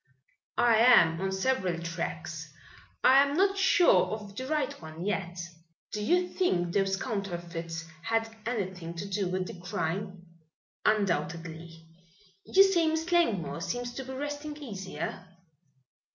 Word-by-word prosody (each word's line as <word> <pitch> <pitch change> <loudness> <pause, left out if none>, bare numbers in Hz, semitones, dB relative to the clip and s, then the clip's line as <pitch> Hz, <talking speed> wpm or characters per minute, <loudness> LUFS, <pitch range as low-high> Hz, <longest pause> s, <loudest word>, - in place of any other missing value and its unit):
"I 235 -2 +5
am 185 -8 +6
on 195 0 -1
several 190 -3 0
tracks. 170 0 -5 0.5
I 265 +1 +8
am 285 +2 +1
not 390 +1 +3
sure 385 -2 +5
of 210 -2 -6
the 260 +4 -5
right 305 0 0
one 160 +2 -7
yet." 180 -4 -2 0.5
"Do 210 - -3
you 360 +9 +3
think 175 - 0
those 195 -1 +2
counterfeits 175 -6 -4 0.2
had 225 +4 0 0.2
anything 185 -7 -3
to 180 +4 -5
do 195 -1 -1
with 185 +1 -1
the 180 - -8
crime?" 180 +1 -3 0.6
"Undoubtedly. 165 -4 -1 0.6
You 390 - +7
say 355 -4 +3
Miss 320 +2 -1
Langmore 185 - +1
seems 240 +7 -3
to 265 - -5
be 265 0 -7
resting 290 +2 -5
easier?" 195 -8 -6
200 Hz, 135 wpm, -29 LUFS, 175-265 Hz, 0.6 s, I